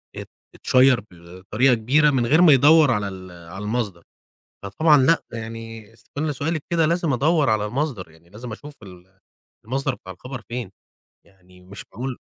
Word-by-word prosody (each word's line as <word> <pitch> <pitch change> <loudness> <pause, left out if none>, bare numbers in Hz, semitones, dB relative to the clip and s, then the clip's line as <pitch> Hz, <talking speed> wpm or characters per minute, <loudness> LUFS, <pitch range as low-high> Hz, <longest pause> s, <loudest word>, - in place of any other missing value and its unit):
أت - - -8 0.3
أتشيّر 130 -1 +3
بطريقة 95 +9 -1
كبيرة 135 +7 +2
من 130 -4 0
غير 155 +8 +3
ما 165 -4 +7
يدوّر 145 +2 +5
على 105 -3 -1
ال 95 -2 -9
على 85 +3 -10
المصدر. 105 -6 -3 0.6
فطبعًا 150 +10 +3
لأ 165 +5 +3
يعني 115 -1 -9
ست 120 - -14
سؤالِك 145 +2 -3
كده 165 -2 +2
لازم 170 -3 0
أدور 150 +2 +2
على 105 -1 0
المصدر، 120 - -4
يعني 80 +2 -23
لازم 115 +3 -9
أشوف 145 +6 -10
ال 95 -1 -16 0.5
المصدر 135 +3 -2
بتاع 95 -5 -11
الخبر 125 +7 -9
فين، 120 -4 -5 0.6
يعني 90 -1 -22
مش 95 +2 -12
معقول 125 +4 -5
115 Hz, 160 wpm, -22 LUFS, 95-140 Hz, 0.6 s, ما